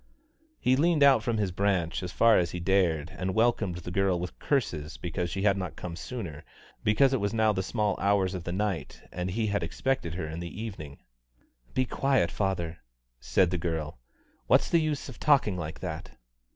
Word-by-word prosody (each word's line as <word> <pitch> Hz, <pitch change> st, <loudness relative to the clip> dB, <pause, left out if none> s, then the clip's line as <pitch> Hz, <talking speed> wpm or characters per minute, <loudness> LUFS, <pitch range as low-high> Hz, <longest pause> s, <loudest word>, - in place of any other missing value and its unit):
He 130 Hz, -, +3 dB
leaned 155 Hz, +1 st, +3 dB
out 135 Hz, -5 st, +6 dB
from 115 Hz, 0 st, -1 dB
his 100 Hz, -3 st, 0 dB
branch 90 Hz, -3 st, 0 dB
as 90 Hz, -1 st, -5 dB
far 115 Hz, +3 st, +5 dB
as 85 Hz, -1 st, 0 dB
he 90 Hz, -, -5 dB
dared, 85 Hz, -3 st, +1 dB
and 95 Hz, 0 st, -2 dB
welcomed 110 Hz, -5 st, +2 dB
the 90 Hz, 0 st, -7 dB
girl 95 Hz, -1 st, +1 dB
with 90 Hz, +1 st, -6 dB
curses 80 Hz, -, -1 dB
because 85 Hz, 0 st, -3 dB
she 95 Hz, +3 st, -3 dB
had 100 Hz, -2 st, +3 dB
not 90 Hz, -4 st, -4 dB
come 85 Hz, -2 st, -6 dB
sooner, 90 Hz, -, -6 dB, 0.4 s
because 130 Hz, +6 st, +4 dB
it 135 Hz, -, +2 dB
was 100 Hz, +2 st, -1 dB
now 110 Hz, -1 st, +3 dB
the 95 Hz, -, -1 dB
small 105 Hz, +1 st, 0 dB
hours 100 Hz, -2 st, +2 dB
of 90 Hz, -2 st, -5 dB
the 85 Hz, -, -4 dB
night 95 Hz, -6 st, -3 dB
and 90 Hz, +1 st, -3 dB
he 110 Hz, +4 st, -1 dB
had 100 Hz, -1 st, 0 dB
expected 130 Hz, -12 st, -2 dB
her 90 Hz, -, -3 dB
in 80 Hz, +2 st, -5 dB
the 85 Hz, +3 st, -7 dB
evening. 90 Hz, -11 st, -7 dB, 0.8 s
"Be 130 Hz, -, +2 dB
quiet, 130 Hz, -9 st, +1 dB
father," 85 Hz, -5 st, -2 dB, 0.4 s
said 65 Hz, +9 st, +2 dB
the 90 Hz, -, -1 dB
girl; 80 Hz, -6 st, -3 dB, 0.5 s
"what's -, -, +4 dB
the 170 Hz, -, +4 dB
use 155 Hz, -2 st, -2 dB
of 130 Hz, -, -10 dB
talking 140 Hz, -10 st, +3 dB
like 80 Hz, -3 st, -6 dB
that!" 80 Hz, -7 st, -6 dB
95 Hz, 195 wpm, -28 LUFS, 85-110 Hz, 0.8 s, out